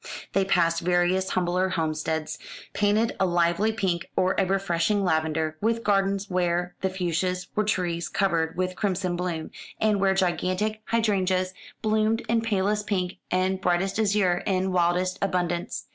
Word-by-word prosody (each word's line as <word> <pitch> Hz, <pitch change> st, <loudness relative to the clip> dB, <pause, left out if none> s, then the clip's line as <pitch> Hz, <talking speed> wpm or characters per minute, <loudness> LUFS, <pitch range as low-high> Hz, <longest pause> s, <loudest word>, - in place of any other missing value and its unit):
They 195 Hz, -1 st, +2 dB
passed 170 Hz, -3 st, +2 dB
various 180 Hz, +2 st, +2 dB
humbler 180 Hz, +1 st, +1 dB
homesteads, 160 Hz, -2 st, -2 dB, 0.3 s
painted 210 Hz, +2 st, +2 dB
a 190 Hz, -, +3 dB
lively 175 Hz, +4 st, +2 dB
pink, 180 Hz, -5 st, -2 dB
or 185 Hz, +1 st, +2 dB
a 195 Hz, -, +2 dB
refreshing 195 Hz, +1 st, +1 dB
lavender, 160 Hz, -2 st, 0 dB
with 230 Hz, +2 st, 0 dB
gardens 195 Hz, -1 st, +1 dB
where 180 Hz, -1 st, 0 dB
the 190 Hz, -, +1 dB
fuchsias 180 Hz, 0 st, -2 dB
were 215 Hz, -, +2 dB
trees 175 Hz, -5 st, -1 dB
covered 165 Hz, -5 st, 0 dB
with 185 Hz, 0 st, -1 dB
crimson 185 Hz, -3 st, -1 dB
bloom, 175 Hz, -3 st, -3 dB, 0.3 s
and 215 Hz, -2 st, +2 dB
where 195 Hz, 0 st, +3 dB
gigantic 190 Hz, +3 st, 0 dB
hydrangeas 190 Hz, -5 st, +1 dB, 0.3 s
bloomed 215 Hz, +1 st, +2 dB
in 230 Hz, 0 st, +2 dB
palest 210 Hz, -1 st, 0 dB
pink 185 Hz, -4 st, -1 dB
and 185 Hz, +1 st, 0 dB
brightest 190 Hz, +3 st, 0 dB
azure 200 Hz, -4 st, +2 dB
in 190 Hz, -1 st, +1 dB
wildest 180 Hz, +1 st, +1 dB
abundance. 175 Hz, -3 st, -1 dB
185 Hz, 145 wpm, -26 LUFS, 175-200 Hz, 0.3 s, a